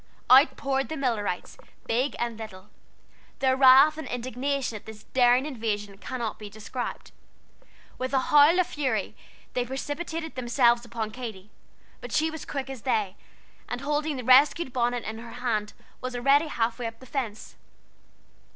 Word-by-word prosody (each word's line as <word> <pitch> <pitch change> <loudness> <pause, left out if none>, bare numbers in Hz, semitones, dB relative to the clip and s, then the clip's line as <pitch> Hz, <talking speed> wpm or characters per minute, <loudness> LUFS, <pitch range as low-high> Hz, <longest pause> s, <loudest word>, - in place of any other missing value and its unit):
Out 270 +4 +7
poured 270 0 -1
the 315 - -4
Millerites, 225 -9 -2 0.3
big 250 +5 0
and 235 -1 -2
little. 205 -3 -10 0.7
Their 260 -1 +2
wrath 270 +4 +7
and 310 - -6
indignation 255 +1 -2
at 210 0 -10
this 220 -1 -10
daring 250 +1 +3
invasion 210 -7 -4
cannot 240 -3 -4
be 210 -1 -8
described. 220 +4 -6 0.9
With 255 0 -2
a 270 - +3
howl 295 +6 +5
of 365 - +4
fury 260 -11 -2 0.4
they 250 - 0
precipitated 315 +5 -5
themselves 240 -1 +2
upon 225 -2 -4
Katy, 215 -5 -8 0.5
but 245 - -9
she 315 +5 +1
was 320 - -7
quick 275 -2 -4
as 265 -4 -7
they, 210 -6 0 0.5
and 245 - -4
holding 295 +1 -1
the 250 - -5
rescued 260 +3 +5
bonnet 245 -1 0
in 220 +1 -6
her 230 0 -10
hand, 230 -4 -2 0.3
was 255 0 -4
already 275 +5 +3
half 230 -4 -1
way 240 - -2
up 225 0 -9
the 260 - -13
fence. 240 -6 -5
250 Hz, 160 wpm, -26 LUFS, 225-275 Hz, 0.9 s, Out